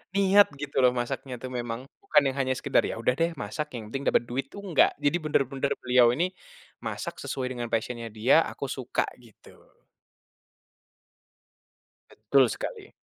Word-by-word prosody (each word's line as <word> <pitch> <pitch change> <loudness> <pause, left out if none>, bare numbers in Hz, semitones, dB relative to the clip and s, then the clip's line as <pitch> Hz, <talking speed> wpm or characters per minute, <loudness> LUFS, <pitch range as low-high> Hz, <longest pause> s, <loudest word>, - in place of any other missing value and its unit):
niat 200 +1 +6
gitu 140 -1 -3
loh 125 - +6
masaknya 125 +1 -3
tuh 130 - -7
memang. 120 -1 -4 0.2
Bukan 150 -7 +4
yang 135 - -2
hanya 130 - -1
sekedar, - - +2
"Ya - - -4
udah 115 - +2
deh 165 +1 +2
masak, 110 +9 -4
yang 110 -3 -6
penting 135 +2 -4
dapet - - +3
duit." 125 +3 -3
Tuh - - -9
enggak. 180 -6 +4
Jadi 145 +3 +3
benar-benar 135 -2 0
beliau 125 -1 +5
ini 175 +6 0 0.5
masak - - -4
sesuai 130 -1 -3
dengan 120 -1 -3
passion-nya 115 +1 -2
dia, 120 +9 +4
"Aku 140 - -5
suka." 130 -2 -2 0.2
Gitu. 115 -4 -18 2.5
Betul 125 +5 +3
sekali. - - -6
130 Hz, 155 wpm, -27 LUFS, 120-145 Hz, 2.5 s, niat